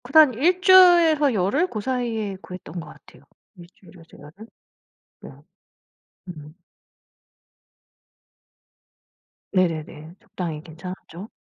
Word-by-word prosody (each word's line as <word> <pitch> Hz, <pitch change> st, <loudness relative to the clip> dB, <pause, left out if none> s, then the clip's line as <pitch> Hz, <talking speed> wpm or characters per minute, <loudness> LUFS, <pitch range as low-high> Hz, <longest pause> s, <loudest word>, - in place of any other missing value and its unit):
그다음 280 Hz, +1 st, +4 dB
1 350 Hz, +10 st, 0 dB
주일에서 345 Hz, -7 st, +5 dB
열흘 215 Hz, -, 0 dB
고 220 Hz, -, -6 dB
사이에 225 Hz, -4 st, -3 dB
구했던 180 Hz, -2 st, -10 dB
것 165 Hz, -, -10 dB
같아요. -, -, -18 dB, 0.3 s
1 175 Hz, -2 st, -14 dB
주일에서 170 Hz, -3 st, -19 dB
열흘. 160 Hz, +10 st, -14 dB, 0.8 s
네. -, -, -11 dB, 1.0 s
음. 155 Hz, -3 st, -11 dB, 3.0 s
네네네. 165 Hz, -3 st, -3 dB
적당히 165 Hz, -4 st, -7 dB
괜찮았죠? 180 Hz, +4 st, -11 dB
195 Hz, 200 characters per minute, -22 LUFS, 165-275 Hz, 3.0 s, 주일에서